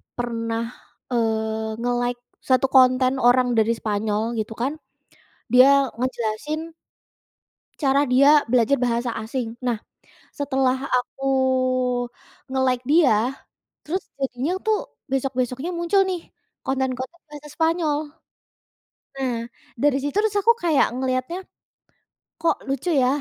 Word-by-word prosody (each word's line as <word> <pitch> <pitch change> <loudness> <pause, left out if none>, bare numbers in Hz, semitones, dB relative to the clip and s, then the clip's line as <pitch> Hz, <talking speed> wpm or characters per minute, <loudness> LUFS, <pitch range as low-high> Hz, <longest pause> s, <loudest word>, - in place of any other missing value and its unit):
pernah, 230 -1 -2 0.5
eee, 220 -1 -1
nge-like 245 0 -1 0.3
1 260 +1 +4
konten 255 0 +5
orang 250 0 +5
dari 220 +1 +3
Spanyol 210 0 -1 0.2
gitu 215 +1 -3
kan, 270 +4 0 0.8
dia 255 +2 +8 0.3
ngejelasin 260 +6 -3 1.1
cara 280 -1 +3
dia 280 +4 +6
belajar 250 +2 +3
bahasa 240 0 0
asing 225 0 -4
nah, 240 -3 0 0.6
setelah 265 -2 +1 0.2
aku 250 +2 -4 1.3
nge-like 260 -2 +1
dia, 265 -6 +3 0.5
terus 365 +5 -3 0.2
jadinya 270 +4 -1
tuh 435 -1 +2 0.3
besok-besoknya 260 +2 -1
muncul 345 +3 +2
nih, 365 -2 -2 0.5
konten-konten 265 +4 -2
bahasa 295 0 -10
Spanyol. 320 -2 +1 1.2
Nah 260 -3 -1 0.5
dari 290 -2 +3
situ 290 +3 -3
terus 425 -1 +1
aku 460 - +6
kayak 320 -5 +4
ngelihatnya, 255 +6 -1 1.0
kok 330 +1 +2
lucu 275 +6 -2
ya, - - +3
260 Hz, 105 wpm, -23 LUFS, 240-290 Hz, 1.3 s, dia